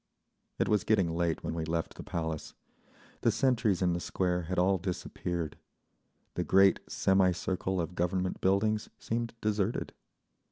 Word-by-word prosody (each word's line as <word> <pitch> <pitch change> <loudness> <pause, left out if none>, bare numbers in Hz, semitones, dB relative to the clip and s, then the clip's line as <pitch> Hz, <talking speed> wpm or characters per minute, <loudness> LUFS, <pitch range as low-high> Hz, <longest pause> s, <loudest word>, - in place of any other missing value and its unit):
It - - +1
was 105 -4 +2
getting 95 -6 +2
late 85 -1 0
when - - -2
we 80 -1 -2
left 80 +1 -2
the - - -9
Palace. 80 -2 -4 0.7
The - - +4
sentries 120 -8 +2
in 90 -1 +3
the 85 - -1
Square 90 -1 -1
had 95 - -1
all 95 +1 +3
disappeared. 85 -2 -4 0.7
The - - -1
great 95 0 +5
semi 95 -1 +3
circle 95 +1 -2
of 85 +1 -2
Government 90 +1 -1
buildings 105 +3 +2
seemed 115 0 -3
deserted. 105 0 -1
95 Hz, 150 wpm, -31 LUFS, 85-100 Hz, 0.7 s, great